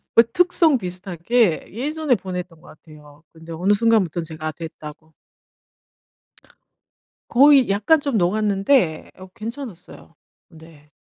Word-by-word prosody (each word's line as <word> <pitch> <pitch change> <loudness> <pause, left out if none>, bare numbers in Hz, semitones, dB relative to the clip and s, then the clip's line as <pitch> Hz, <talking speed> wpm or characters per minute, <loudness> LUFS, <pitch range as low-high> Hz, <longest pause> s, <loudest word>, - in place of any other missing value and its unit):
그 230 - +8
특송 345 -5 +3
비슷하게 185 +1 -1
예전에 290 +4 -1
보냈던 180 -4 -7
것 - - -19
같아요. 150 0 -17
근데 160 +1 -13
어느 180 +5 +1
순간부턴 200 -7 +1
제가 155 0 -6
됐다고... 160 -1 -11 2.2
거의 275 -1 +5
약간 210 +11 +2
좀 280 -6 -2
녹았는데 195 - +1
어 185 0 -12
괜찮았어요. 220 - -10 0.3
네. 160 -3 -18
185 Hz, 250 characters per minute, -21 LUFS, 160-235 Hz, 2.2 s, 그